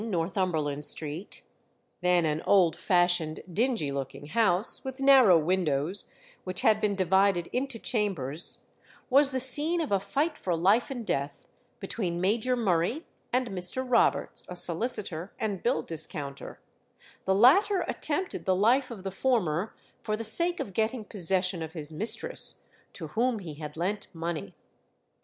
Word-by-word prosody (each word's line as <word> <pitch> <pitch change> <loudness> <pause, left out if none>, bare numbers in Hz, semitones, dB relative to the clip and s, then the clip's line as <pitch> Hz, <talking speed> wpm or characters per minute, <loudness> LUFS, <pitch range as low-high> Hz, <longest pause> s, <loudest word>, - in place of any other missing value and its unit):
16 225 - -5
Northumberland 165 -5 -2
Street, 155 +6 -4 0.6
then 180 -1 +2
an 155 0 -1
old 180 -5 +4
fashioned, 175 -3 +1
dingy 225 - 0
looking 140 +1 -6
house, 205 -1 +1
with 265 0 -7
narrow 265 -9 +6
windows, 165 +1 0 0.3
which 185 -1 -4
had 220 -4 +3
been 205 -1 0
divided 190 -1 +2
into 260 -1 -2
chambers, 185 - -2 0.5
was 275 +2 +5
the 260 -1 -2
scene 295 +7 +3
of 315 -7 -3
a 200 - +2
fight 285 - -2
for 180 -2 -1
life 195 +8 +2
and 245 -4 -6
death 140 -3 -3 0.3
between 185 -3 -3
Major 220 +7 +1
Murray 220 - 0 0.3
and 250 -1 0
Mr. 195 +7 -2
Roberts, 250 - +1
a 180 - -7
solicitor 180 -1 +4
and 205 -4 -3
bill 245 +3 0
discounter; 145 -3 -4 0.7
the 190 - +2
latter 350 - +4
attempted 315 +5 -3
the 185 - +2
life 245 +7 +2
of 220 -6 -9
the 195 - -4
former 195 -5 -1 0.3
for 215 -1 -3
the 230 - -5
sake 340 +11 0
of 195 - -5
getting 220 +2 -1
possession 185 -3 -1
of 160 0 -6
his 155 -2 -3
mistress, 205 +9 +1 0.3
to 160 -4 -8
whom 235 +5 0
he 175 -7 -8
had 150 +1 -9
lent 200 +5 -3
money. 165 -9 -5
195 Hz, 150 wpm, -27 LUFS, 170-240 Hz, 0.7 s, narrow